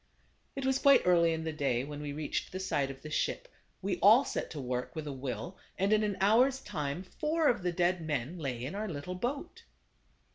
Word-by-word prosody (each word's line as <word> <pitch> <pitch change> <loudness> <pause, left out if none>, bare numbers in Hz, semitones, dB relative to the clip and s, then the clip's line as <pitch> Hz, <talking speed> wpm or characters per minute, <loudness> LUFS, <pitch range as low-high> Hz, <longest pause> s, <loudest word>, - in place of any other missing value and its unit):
It 275 -1 -3
was 265 0 +2
quite 280 0 +6
early 170 -2 +5
in 160 0 -2
the 160 -1 -3
day 135 -5 0
when 145 +1 -7
we 145 -1 -4
reached 150 0 -3
the 185 - -4
side 145 -8 0
of 135 0 -9
the 155 - -7
ship. - - -1 0.4
We 190 -2 -1
all 225 +7 +7
set - - -3
to 155 - -6
work 125 +3 -3
with 155 -1 -4
a 145 - -4
will, 135 +7 -5 0.2
and 195 +3 +2
in 215 - +4
an 210 -2 -1
hour's 245 +7 +4
time 155 - -4
four 305 - 0
of 240 -6 +2
the 180 0 0
dead 175 0 +1
men 155 +1 -3
lay 130 -5 -3
in 145 - -5
our 210 +2 -3
little 155 +3 -5
boat. 280 - -4
175 Hz, 220 wpm, -31 LUFS, 145-215 Hz, 0.4 s, all